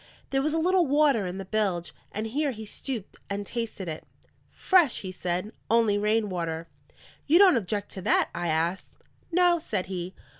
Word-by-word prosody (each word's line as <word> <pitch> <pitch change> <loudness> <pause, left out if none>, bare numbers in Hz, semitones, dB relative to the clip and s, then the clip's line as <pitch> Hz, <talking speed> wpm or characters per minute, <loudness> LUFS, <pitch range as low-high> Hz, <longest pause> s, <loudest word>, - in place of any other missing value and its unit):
There 270 0 +2
was 305 +2 0
a - - +1
little 355 +1 +3
water 280 -8 +3
in 180 +1 -5
the 195 - -6
bilge, 185 -6 -1 0.2
and 215 +2 -3
here 285 +6 0
he 220 -4 -6
stooped 225 -1 -5
and 200 0 -3
tasted 225 -4 -4
it. 155 -1 -5 0.5
"Fresh," 350 -9 +3
he 185 - -5
said. 180 +3 -3 0.2
"Only 225 -2 +4
rain 215 +1 +2
water." 165 -3 -3 0.6
"You 315 +4 +6
don't 375 -4 +7
object 205 -2 -2
to 190 - -7
that?" - - +2
I 175 - -2
asked. 165 +3 -1 0.4
"No," 350 0 +4
said 205 -11 -2
he. 185 0 -5
210 Hz, 180 wpm, -27 LUFS, 185-275 Hz, 0.6 s, don't